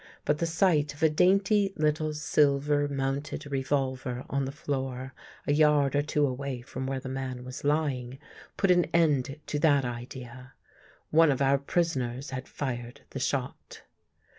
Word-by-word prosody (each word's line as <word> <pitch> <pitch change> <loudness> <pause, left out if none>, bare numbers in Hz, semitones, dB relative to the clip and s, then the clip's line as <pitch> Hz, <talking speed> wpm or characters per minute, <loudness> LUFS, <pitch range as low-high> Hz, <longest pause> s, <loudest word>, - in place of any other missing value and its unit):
But 150 - +1
the 170 - 0
sight 160 -4 +2
of 145 - -7
a 160 - +5
dainty 195 +4 +3
little 155 0 +1
silver 145 -1 +2
mounted 140 +1 -3
revolver 130 -2 -2
on 140 -1 0
the 135 - -4
floor, 135 -3 -4 0.3
a 145 - +2
yard 150 -2 +4
or 145 - +4
two 150 0 +1
away 130 -1 -3
from 130 +2 -6
where 135 0 -2
the 130 - -8
man 130 -1 -4
was 130 +1 -8
lying, 140 -4 0 0.4
put 195 - +3
an 175 -1 +4
end 150 -4 +2
to 150 - -2
that 145 -3 +4
idea. 125 +1 -7 0.6
One 165 0 +6
of 135 - -1
our 140 0 +3
prisoners 135 -4 -1
had 130 -1 -5
fired 120 -1 -5
the 135 - -5
shot. 130 0 -3
140 Hz, 160 wpm, -28 LUFS, 130-150 Hz, 0.6 s, One